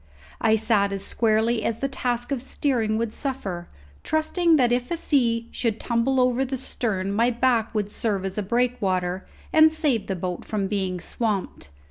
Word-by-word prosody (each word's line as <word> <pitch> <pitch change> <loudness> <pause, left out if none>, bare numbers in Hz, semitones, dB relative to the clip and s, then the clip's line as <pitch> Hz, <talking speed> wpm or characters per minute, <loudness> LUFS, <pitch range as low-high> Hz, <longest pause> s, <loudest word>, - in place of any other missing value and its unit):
I 220 -1 +4
sat 215 -2 +2
as 195 -1 -3
squarely 225 0 +1
as 230 - -1
the 275 - -1
task 245 -1 -2
of 270 -3 -1
steering 240 -5 0
would 230 -1 -2
suffer, 195 -11 -3 0.4
trusting 320 +2 +2
that 250 -5 +3
if 245 0 0
a 340 - -1
sea 235 -7 +1
should 225 -3 -1
tumble 245 +3 +1
over 250 +1 +2
the 265 0 -3
stern 200 -7 -2
my 230 +4 +3
back 235 -2 +1
would 210 -1 -1
serve 200 -4 -1
as 190 - -3
a 210 - -1
breakwater, 195 -5 0 0.3
and 315 0 +7
save 300 -8 0
the 190 - -1
boat 180 0 -4
from 205 -2 -2
being 190 -2 -2
swamped. 205 - -3
230 Hz, 175 wpm, -24 LUFS, 200-255 Hz, 0.4 s, and